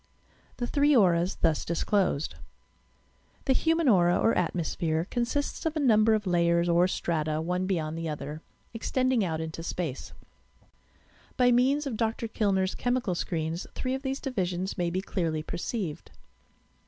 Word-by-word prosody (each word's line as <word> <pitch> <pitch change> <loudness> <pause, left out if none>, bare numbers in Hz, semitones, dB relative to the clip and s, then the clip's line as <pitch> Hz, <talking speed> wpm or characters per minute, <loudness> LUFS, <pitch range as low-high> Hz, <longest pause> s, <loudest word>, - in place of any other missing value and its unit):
THE 240 - -2
THEEE 285 +3 +3
AUEAS 180 -4 +3
THUS 160 -2 +2
DISCLOSED 170 -3 0 1.1
The 265 - +3
human 325 +3 +2
aura 175 -6 +5
or 225 - +2
atmosphere 165 -1 -1
consists 240 +4 -1
of 320 -1 -1
a - - 0
number 220 -5 +4
of 210 -1 -2
layers 170 -1 +2
or 175 +1 +4
strata 155 -4 -1
one 180 +3 -1
beyond 160 -5 -1
the 165 0 -3
other, 150 +1 -6 0.3
extending 255 +1 +1
out 160 -4 -2
into 160 0 -5
space. 165 -5 -4 1.3
By 245 -1 +5
means 265 +5 +3
of 250 -6 -3
Dr. 225 0 -1
Kllner's 195 -4 0
chemical 245 -6 -1
screens 165 -1 -3
three 255 0 -2
of 265 - -3
these 270 0 -3
divisions 185 -8 -2
may 175 -3 0
be 185 +2 -2
clearly 165 -5 -2
perceived. 175 -1 -4
185 Hz, 145 wpm, -28 LUFS, 170-245 Hz, 1.3 s, aura